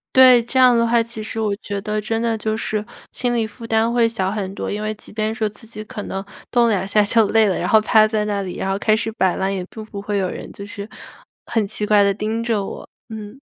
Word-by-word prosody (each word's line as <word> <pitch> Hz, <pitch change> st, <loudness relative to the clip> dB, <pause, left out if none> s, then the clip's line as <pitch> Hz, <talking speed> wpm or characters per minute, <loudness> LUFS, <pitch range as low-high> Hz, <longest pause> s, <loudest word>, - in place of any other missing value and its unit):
对， 255 Hz, -2 st, +8 dB
这 250 Hz, +3 st, -1 dB
样 250 Hz, -2 st, +6 dB
的 230 Hz, -, +3 dB
话， 235 Hz, 0 st, +3 dB
其 230 Hz, -1 st, -5 dB
实 220 Hz, +1 st, -4 dB
我 210 Hz, -2 st, 0 dB
觉 200 Hz, -1 st, -5 dB
得 215 Hz, 0 st, -2 dB
真 225 Hz, +2 st, -2 dB
的 230 Hz, -1 st, 0 dB
就 215 Hz, 0 st, -2 dB
是， 215 Hz, -1 st, -2 dB, 0.3 s
心 245 Hz, -1 st, -1 dB
理 225 Hz, -2 st, 0 dB
负 220 Hz, +2 st, -11 dB
担 225 Hz, +1 st, +2 dB
会 235 Hz, -1 st, +3 dB
小 195 Hz, -5 st, -1 dB
很 195 Hz, -3 st, -3 dB
多。 -, -, -4 dB
因 205 Hz, -, -3 dB
为 215 Hz, 0 st, -2 dB
即 205 Hz, -, -13 dB
便 215 Hz, +1 st, -1 dB
说， 220 Hz, -2 st, -1 dB
自 210 Hz, +3 st, -13 dB
己 215 Hz, -1 st, -8 dB
可 210 Hz, -, -7 dB
能 195 Hz, 0 st, -4 dB, 0.3 s
动 240 Hz, -1 st, +4 dB
了 -, -, +2 dB
2 195 Hz, -3 st, 0 dB
下 210 Hz, +1 st, +3 dB
就 215 Hz, +2 st, +4 dB
累 220 Hz, -1 st, +4 dB
了， 190 Hz, -, 0 dB
然 180 Hz, -, -2 dB
后 220 Hz, -1 st, +5 dB
趴 215 Hz, 0 st, +5 dB
在 215 Hz, -1 st, 0 dB
那 205 Hz, -1 st, -1 dB
里， 180 Hz, -, -6 dB
然 190 Hz, -, -2 dB
后 195 Hz, -, 0 dB
开 215 Hz, +1 st, +2 dB
始 225 Hz, 0 st, -2 dB
摆 190 Hz, -4 st, +1 dB
烂， 190 Hz, 0 st, 0 dB
也 185 Hz, -2 st, -3 dB
并 220 Hz, -, -8 dB
不 205 Hz, -2 st, -8 dB
会 205 Hz, 0 st, -2 dB
有 185 Hz, -2 st, 0 dB
人， -, -, -7 dB
就 200 Hz, -, -9 dB
是 205 Hz, 0 st, -7 dB, 0.6 s
很 225 Hz, -3 st, +1 dB
奇 210 Hz, -, -3 dB
怪 210 Hz, -1 st, +4 dB
地 200 Hz, 0 st, +3 dB
盯 220 Hz, +3 st, -2 dB
着 225 Hz, -4 st, 0 dB
我， -, -, -7 dB, 0.2 s
嗯。 220 Hz, +2 st, -8 dB
215 Hz, 290 characters per minute, -20 LUFS, 205-225 Hz, 0.6 s, 对